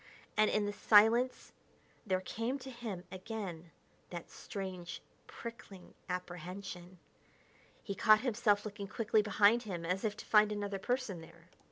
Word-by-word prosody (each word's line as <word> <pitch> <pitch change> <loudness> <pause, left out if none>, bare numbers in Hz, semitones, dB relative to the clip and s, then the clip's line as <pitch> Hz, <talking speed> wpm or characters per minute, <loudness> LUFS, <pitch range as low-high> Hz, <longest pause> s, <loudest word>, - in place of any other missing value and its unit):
And 215 0 +4
in 210 -1 +1
the 205 - -2
silence 225 +5 +4 0.6
there 185 -1 +1
came 230 +7 -2
to 265 -1 -9
him 225 -7 -6
again 185 -4 -6 0.4
that 175 -1 -7
strange, 185 -3 -6 0.3
prickling 215 -5 -10 0.2
apprehension. 180 0 -6 0.9
He 200 - -3
caught 215 +2 +5
himself 215 -4 +2
looking 205 -1 -5
quickly 220 +2 +2
behind 210 +2 +4
him 180 -7 -5
as 180 +3 -1
if 210 -2 -1
to - - -8
find 210 -1 +5
another 205 -1 -3
person 245 -5 -2
there. 165 +1 -16
205 Hz, 140 wpm, -34 LUFS, 185-220 Hz, 0.9 s, caught